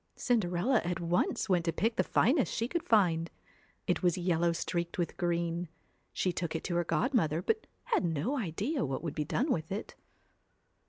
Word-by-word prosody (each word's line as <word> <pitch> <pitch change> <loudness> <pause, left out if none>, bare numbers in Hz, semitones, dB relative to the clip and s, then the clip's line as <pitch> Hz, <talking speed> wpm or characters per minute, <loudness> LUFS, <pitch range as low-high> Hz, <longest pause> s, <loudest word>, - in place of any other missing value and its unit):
Cinderella 220 0 +1
at 175 0 -2
once 175 +5 0
want 180 -4 +2
to 165 - +2
pick 220 +8 0
the - - +2
finest 265 +3 +2
she 230 - -1
could 340 +6 -1
find; 175 - +3 0.6
it 180 - 0
was 175 -2 +2
yellow 175 -1 +2
streaked 170 +1 -2
with 175 -2 -1
green. 170 -1 -1 0.4
She 180 - 0
took 170 -2 -3
it 160 - -2
to 175 - -2
her 175 - +2
godmother, 165 - +1
but 440 0 0 0.2
had - - +1
no 170 - 0
idea 230 - -1
what 135 +4 -3
would 160 -4 -3
be 150 - -2
done 260 - 0
with 160 -3 -1
it. 200 - -4
175 Hz, 180 wpm, -31 LUFS, 170-225 Hz, 0.6 s, find